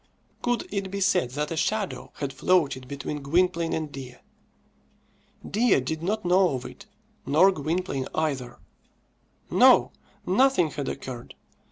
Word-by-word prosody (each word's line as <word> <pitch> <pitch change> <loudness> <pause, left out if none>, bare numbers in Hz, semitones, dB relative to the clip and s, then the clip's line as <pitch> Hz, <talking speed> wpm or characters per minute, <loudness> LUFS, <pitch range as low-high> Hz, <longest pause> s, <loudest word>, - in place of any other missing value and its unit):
Could 245 -1 -1
it 195 -1 -2
be 200 +1 -4
said 185 -8 +2
that 150 +1 -2
a - - -2
shadow 205 +4 -2
had 140 -1 -4
floated 145 -8 +1
between 140 +2 -5
Gwynplaine 170 +3 +1
and 155 -2 -3
Dea? 130 -3 -8 1.3
Dea 220 - +3
did 155 +5 -4
not 210 +4 -2
know 180 -3 +3
of 125 - -6
it, - - -11 0.4
nor 160 +8 +5
Gwynplaine 155 -3 -2
either. 135 -6 -2 0.9
No; - - +6 0.3
nothing 190 - +3
had 145 -2 -4
occurred. 125 -3 -7
160 Hz, 135 wpm, -26 LUFS, 140-190 Hz, 1.3 s, No